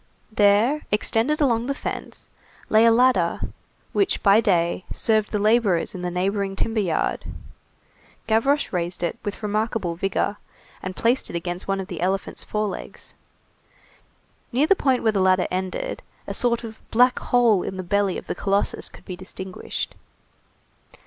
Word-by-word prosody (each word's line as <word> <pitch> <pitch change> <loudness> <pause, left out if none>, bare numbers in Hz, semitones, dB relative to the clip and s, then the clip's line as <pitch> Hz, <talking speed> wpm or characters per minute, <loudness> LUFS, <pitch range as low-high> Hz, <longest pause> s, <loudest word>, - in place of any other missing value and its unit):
There, 215 +8 +3
extended 225 +8 +1
along 240 -4 +2
the 280 - -1
fence, - - -6 0.4
lay 220 +1 +5
a 230 - +7
ladder 230 -8 +3 0.5
which 395 - +1
by 205 +2 +6
day 175 -4 +1
served 215 -2 +1
the 210 - 0
laborers 210 -4 +2
in 185 - -6
the 180 - -2
neighboring 195 +2 -1
timber 225 +3 -1
yard. 175 -6 0 1.0
Gavroche 270 +6 +1
raised 175 0 -2
it 170 - -2
with 205 +1 -5
remarkable 210 -3 -1
vigor, 195 +3 -1 0.4
and 185 0 -5
placed 240 +3 +1
it - - -6
against 175 +1 -4
one 195 0 0
of 190 - -3
the 175 -4 -6
elephant's 190 +2 -2
forelegs. 210 -2 -4 1.4
Near 260 +4 +3
the 390 - +4
point 265 -7 +1
where 220 - +4
the 200 -3 0
ladder 185 -1 +4
ended, 185 0 -3 0.2
a - - -4
sort 240 -2 +1
of 220 -1 -9
black 250 +2 +4
hole 235 -6 +3
in 190 - -5
the 185 - -4
belly 200 +1 +1
of - - -8
the - - -3
colossus 200 +2 -1
could - - -16
be 185 - -6
distinguished. 185 0 -5
205 Hz, 155 wpm, -23 LUFS, 185-230 Hz, 1.4 s, a